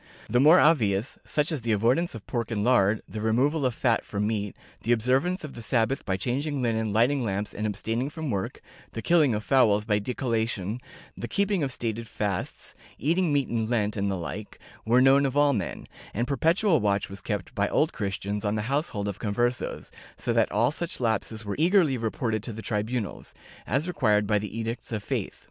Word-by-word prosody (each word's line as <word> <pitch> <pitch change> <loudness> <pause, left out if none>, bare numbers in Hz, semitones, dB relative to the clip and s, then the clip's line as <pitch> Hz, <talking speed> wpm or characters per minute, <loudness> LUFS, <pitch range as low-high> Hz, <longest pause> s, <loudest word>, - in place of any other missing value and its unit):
The 120 +3 +2
more 155 +7 +7
obvious, 115 -8 +2
such 150 +2 0
as 150 -5 -2
the 115 -1 0
avoidance 120 +10 +1
of 110 - -9
pork 115 -2 -2
and 105 -3 -1
lard, 105 -3 +3
the 110 - -6
removal 130 +6 +2
of 120 - -3
fat 120 -4 +1
from 105 0 -2
meat, 105 -2 -2 0.3
the 120 - -1
observance 130 - +1
of 150 - -7
the 115 - -8
Sabbath 120 +3 +1
by 95 -1 0
changing 140 - -2
linen, 110 -2 0
lighting 120 +6 +2
lamps 100 -1 -2
and 105 +1 -2
abstaining 115 +6 -2
from 155 -3 -4
work, 95 -3 -3 0.3
the 115 - -5
killing 155 -7 +4
of 105 - -3
fowls 105 -6 +3
by 105 -1 +2
decollation, 115 -2 -2 0.4
the 120 - -5
keeping 200 - +1
of 140 -2 -1
stated 115 -2 -3
fasts, 100 -4 -3 0.2
eating 170 +3 +1
meat 140 -3 +2
in 115 -2 -1
Lent 105 -3 0
and 100 -1 0
the 95 - -1
like, 100 +4 -6 0.3
were 125 +3 +5
known 135 +1 +6
of 135 0 0
all 145 -1 +5
men, 105 - -3 0.3
and 120 +4 0
perpetual 165 - +3
watch 100 -1 +1
was 100 0 -9
kept 105 -4 -4
by 100 0 0
Old 155 - +2
Christians 100 +1 -3
on 105 0 0
the 105 - -1
households 130 -5 -1
of 100 0 -4
Conversos, 120 +4 -1 0.3
so - - -1
that - - +2
all 120 +4 +2
such 170 +2 -5
lapses 110 -1 -1
were 100 - -2
eagerly 170 -4 +4
reported 115 -1 -1
to 115 +1 -5
the 110 +1 -8
tribunals, 110 0 -3 0.3
as 140 - 0
required 105 -11 +2
by 105 0 +2
the 105 +2 -6
Edicts 115 +2 -4
of 105 -3 -3
Faith. - - -3
115 Hz, 200 wpm, -27 LUFS, 105-135 Hz, 0.4 s, more